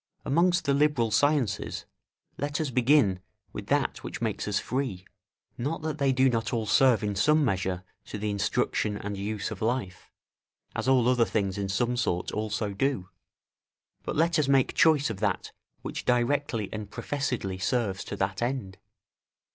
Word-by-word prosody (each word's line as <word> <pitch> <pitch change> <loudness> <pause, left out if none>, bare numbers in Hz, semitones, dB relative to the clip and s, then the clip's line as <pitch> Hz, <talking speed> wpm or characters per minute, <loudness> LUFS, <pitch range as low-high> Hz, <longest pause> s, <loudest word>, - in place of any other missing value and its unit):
Amongst 175 +3 +2
the 140 - +3
liberal 140 -6 +2
sciences, 135 -4 +1 0.5
let 145 +2 -2
us 155 -4 -1
begin 125 -6 +3 0.3
with - - -6
that - - 0
which - - -6
makes - - -2
us - - +1
free; 125 -8 -3 0.5
not 150 +6 -2
that 155 -1 -3
they 140 -1 +3
do 130 +1 +4
not 115 -3 0
all 115 -3 -1
serve 120 0 +4
in 105 -1 -1
some 150 +8 +3
measure 95 -4 -1 0.2
to - - -6
the 105 0 -2
instruction 100 +1 0
and 105 0 -5
use 105 +1 -3
of - - -7
life, 110 -5 -2 0.7
as - - -2
all 130 -3 +4
other 125 -2 +4
things 100 -4 -1
in 100 -1 -3
some 120 +5 0
sort 90 -8 -1
also 105 -1 -2
do; 100 -4 -1 0.9
but - - -4
let 165 +1 +2
us 150 - +2
make 135 -2 +3
choice 155 -7 +4
of 100 - -6
that 100 -3 -1 0.3
which - - -5
directly 125 -2 +1
and 105 -2 -5
professedly 120 -7 -3
serves 100 -2 0
to - - -5
that 95 +1 -2
end. 120 -7 -3
120 Hz, 165 wpm, -28 LUFS, 100-140 Hz, 0.9 s, do